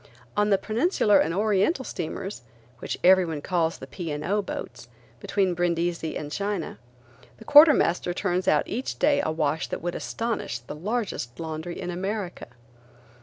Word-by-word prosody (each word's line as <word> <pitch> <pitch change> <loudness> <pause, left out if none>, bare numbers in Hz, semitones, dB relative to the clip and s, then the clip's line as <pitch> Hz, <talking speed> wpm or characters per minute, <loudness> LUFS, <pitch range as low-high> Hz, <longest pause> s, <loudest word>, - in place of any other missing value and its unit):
On 210 0 +2
the 200 - +4
Peninsular 220 - +2
and 160 - +1
Oriental 210 - +1
steamers–which 120 - -6
everyone 180 -4 +4
calls 170 -3 0
the - - -9
P. 155 +4 -6
& 150 +1 -4
O. 205 +4 +1
boats–between 195 -1 -4
Brindisi 170 -1 -1
and 150 -1 -6
China, 200 - -3 0.6
the 220 - -14
quartermaster 290 - +6
turns 180 +1 -1
out - - +3
each 250 +4 -4
day 285 -1 +3
a - - 0
wash 155 0 -1
that - - -5
would 175 0 -2
astonish 230 - -3
the 120 +3 -9
largest 185 - -3
laundry 160 +1 -5
in 180 - -4
America. 190 +1 -4
180 Hz, 145 wpm, -26 LUFS, 160-210 Hz, 0.6 s, quartermaster